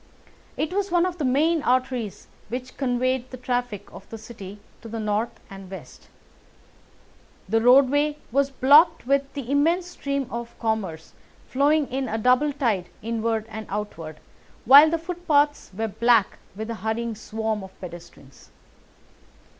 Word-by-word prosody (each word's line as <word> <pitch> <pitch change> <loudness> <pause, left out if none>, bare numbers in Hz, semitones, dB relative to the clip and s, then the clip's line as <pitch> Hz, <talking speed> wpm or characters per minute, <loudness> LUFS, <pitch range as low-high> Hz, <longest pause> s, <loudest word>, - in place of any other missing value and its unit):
It 315 +3 -2
was 400 0 -1
one 350 0 +3
of 360 -1 -4
the - - -1
main 300 +5 +2
arteries 250 -6 -1 0.2
which 250 +2 -6
conveyed 255 -1 -1
the 255 - -8
traffic 245 -5 -3
of 195 - -12
the 225 - -7
City 210 -3 -10 0.2
to 230 - -10
the 225 0 -5
north 215 +2 -2
and 195 -1 -11
west. 165 -10 -11 1.4
The 225 +3 +1
roadway 280 +4 +4
was 275 +2 +2
blocked 295 +5 +5
with 275 +1 +1
the 275 -3 -5
immense 330 +6 +2
stream 280 -6 -3
of 235 0 -6
commerce 205 -8 -3 0.3
flowing 290 +3 +2
in 260 -1 -2
a 220 - -2
double 250 +6 +3
tide 230 -11 -1
inward 225 -1 -1
and 220 -1 -8
outward, 165 -7 -5 0.5
while 285 +5 +9
the 330 - 0
footpaths 320 -4 0
were 220 +4 -3
black 225 0 +2 0.2
with 220 +2 -6
the 230 - -3
hurrying 225 +1 -2
swarm 220 -1 -3
of 190 - -13
pedestrians. 170 -6 -12
245 Hz, 145 wpm, -24 LUFS, 220-280 Hz, 1.4 s, while